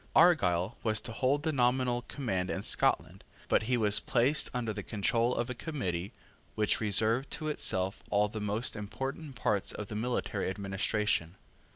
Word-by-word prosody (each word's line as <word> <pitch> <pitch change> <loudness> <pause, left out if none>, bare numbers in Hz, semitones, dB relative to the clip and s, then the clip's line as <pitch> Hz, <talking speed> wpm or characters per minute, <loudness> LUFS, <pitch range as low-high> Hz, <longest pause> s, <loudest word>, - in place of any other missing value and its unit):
Argyle 100 - +4
was 110 -2 +1
to - - -7
hold 135 +5 0
the 160 - +1
nominal 125 -2 +1
command 95 -9 -3
in - - -3
Scotland: - - +1 0.2
but - - +3
he 125 - +3
was 105 -2 +4
placed 130 +7 +2
under 120 -4 -2
the 105 - -5
control 115 +4 0
of 120 - -1
a 125 - -3
Committee 100 - -4 0.4
which 105 0 +1
reserved 110 +5 +3
to 155 - -4
itself 95 -9 0
all 105 0 +3
the 110 +1 -6
most 105 +4 0
important 135 +7 -5
parts 105 -3 0
of 105 - -7
the 105 - -5
military 110 -4 -2
administration. 95 -2 -1
110 Hz, 165 wpm, -31 LUFS, 100-125 Hz, 0.4 s, Argyle